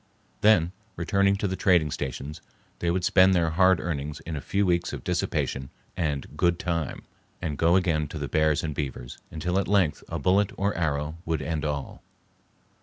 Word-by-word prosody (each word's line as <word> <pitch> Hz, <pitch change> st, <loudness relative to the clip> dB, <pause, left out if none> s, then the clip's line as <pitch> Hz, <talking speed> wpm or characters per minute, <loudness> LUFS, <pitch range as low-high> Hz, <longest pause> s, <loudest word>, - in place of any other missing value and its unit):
Then, 90 Hz, -6 st, +5 dB, 0.2 s
returning 100 Hz, +3 st, +2 dB
to 100 Hz, +1 st, -1 dB
the 95 Hz, -, -2 dB
trading 85 Hz, -6 st, +3 dB
stations, 70 Hz, +3 st, -5 dB, 0.4 s
they 85 Hz, -, 0 dB
would 90 Hz, +1 st, 0 dB
spend 95 Hz, +1 st, +5 dB
their 85 Hz, -2 st, +2 dB
hard 95 Hz, +2 st, +4 dB
earnings 75 Hz, -3 st, -3 dB
in 80 Hz, -, -5 dB
a 75 Hz, -, -4 dB
few 100 Hz, +5 st, 0 dB
weeks 85 Hz, -1 st, +1 dB
of -, -, -6 dB
dissipation 65 Hz, 0 st, -1 dB, 0.3 s
and 75 Hz, -5 st, -2 dB
"good 85 Hz, +2 st, +2 dB
time," 85 Hz, -4 st, -3 dB, 0.4 s
and 80 Hz, -4 st, -3 dB
go 85 Hz, +4 st, +3 dB
again 80 Hz, -5 st, +2 dB
to 80 Hz, -, -7 dB
the 75 Hz, -1 st, -3 dB
bears 75 Hz, +1 st, +2 dB
and 75 Hz, -2 st, -2 dB
beavers, 65 Hz, -4 st, -5 dB
until 90 Hz, +4 st, -1 dB
at 100 Hz, -, -1 dB
length 95 Hz, -7 st, +2 dB
a -, -, -3 dB
bullet 100 Hz, +2 st, +2 dB
or 100 Hz, +1 st, +1 dB
arrow 75 Hz, -1 st, -1 dB
would 80 Hz, -3 st, -2 dB
end 80 Hz, -2 st, -2 dB
all. 70 Hz, -2 st, -4 dB
85 Hz, 180 wpm, -26 LUFS, 75-95 Hz, 0.4 s, Then